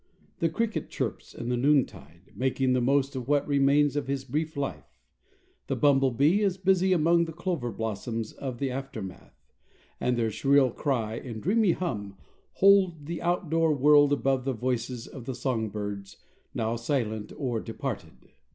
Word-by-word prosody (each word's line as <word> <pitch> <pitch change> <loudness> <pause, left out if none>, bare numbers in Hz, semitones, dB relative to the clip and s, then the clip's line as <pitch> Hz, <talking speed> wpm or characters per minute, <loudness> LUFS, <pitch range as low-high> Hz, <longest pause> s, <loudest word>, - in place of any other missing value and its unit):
The 165 - +2
cricket 225 +6 -2
chirps - - -4
in 120 - -5
the 125 - +1
noontide, 120 - 0
making 130 0 +1
the 125 - +2
most 135 +2 +1
of 125 -2 -5
what 145 0 +2
remains 145 0 +3
of 145 - -2
his 135 -1 -2
brief 155 +4 -3
life; 90 - -5 0.7
the - - -1
bumblebee 140 - +3
is 195 -3 +1
busy 190 0 +2
among 170 0 +4
the 165 - -6
clover 170 -7 -3
blossoms 110 +1 -4
of 130 -3 -6
the 135 +1 -2
aftermath; 125 -8 -7 0.6
and 125 -1 0
their 115 -2 0
shrill 135 +3 +3
cry 115 -5 -1
and 115 -4 -7
dreamy 205 0 +3
hum 105 - -4 0.4
hold 190 -6 +4
the 170 +2 -5
outdoor 165 -3 +1
world 145 +1 +5
above 135 -2 +1
the 135 0 -1
voices 125 0 -2
of 130 -5 -10
the 130 - -4
song 120 -3 -1
birds, 100 -1 -6 0.4
now 115 +1 -1
silent 115 -4 -2
or 125 -6 -1
departed. - - -6
135 Hz, 160 wpm, -27 LUFS, 115-155 Hz, 0.7 s, world